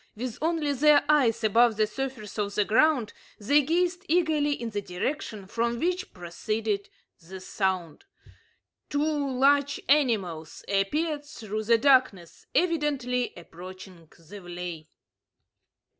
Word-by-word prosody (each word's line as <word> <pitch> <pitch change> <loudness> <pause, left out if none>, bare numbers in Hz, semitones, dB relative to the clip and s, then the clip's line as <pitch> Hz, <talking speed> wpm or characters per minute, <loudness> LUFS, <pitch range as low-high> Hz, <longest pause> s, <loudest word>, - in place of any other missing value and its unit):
With 240 +1 -5
only 315 -3 0
their 290 +2 +5
eyes 265 -7 +3
above 225 +1 +4
the 215 - +3
surface 220 -2 -6
of 205 -1 -2
the 210 - +2
ground, 245 0 +2 0.3
they 285 +8 +4
gazed 350 +5 0
eagerly 315 -3 +2
in 235 -1 -5
the 205 -1 -2
direction 200 +2 -4
from 235 +4 -1
which 360 +3 -1
proceeded 200 +4 -3 0.3
the 185 +2 -10
sound. 185 - -3 0.8
Two 290 -1 0
large 280 +1 +3
animals 205 - 0
appeared 290 +10 0
through 215 -7 -6
the 230 +1 +5
darkness, 255 - +2
evidently 285 -8 0
approaching 180 -1 -12
the 175 +6 -13
vley. 175 -3 -7
235 Hz, 120 wpm, -27 LUFS, 195-290 Hz, 0.8 s, their